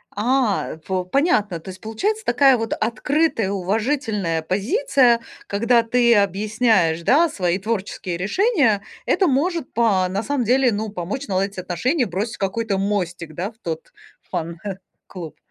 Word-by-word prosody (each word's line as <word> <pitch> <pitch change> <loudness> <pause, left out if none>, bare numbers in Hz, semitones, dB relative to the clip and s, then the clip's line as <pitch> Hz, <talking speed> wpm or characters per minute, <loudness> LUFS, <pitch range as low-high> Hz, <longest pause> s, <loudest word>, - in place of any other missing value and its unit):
А, 230 -3 +1
по 185 -1 -1
понятно, 210 - +1
то 190 - -10
есть 185 - -9
получается 410 - -2
такая 270 - +5
вот 225 0 -2
открытая, 230 0 0
уважительная 205 - -1
позиция, 240 - +2 0.3
когда 230 +3 +2
ты 235 0 +3
объясняешь, 200 -4 +2
да, 320 - +4
свои 180 - 0
творческие 190 -4 -3
решения, 250 - +2 0.2
это 380 - +2
может, 315 +2 0
по 210 -6 +2
на 195 +3 -1
самом 285 0 -1
деле, 250 +2 +3
ну, 215 +1 -3
помочь 205 +8 -5
наладить 195 0 -1
отношения, 240 - 0
бросить 200 +6 -3
какой-то 200 +1 -1
мостик, 180 -5 -2
да, 190 +5 -3
в 220 - -30
тот 165 -4 -6 0.4
фан-клуб. 170 -2 -7
215 Hz, 135 wpm, -21 LUFS, 185-250 Hz, 0.4 s, такая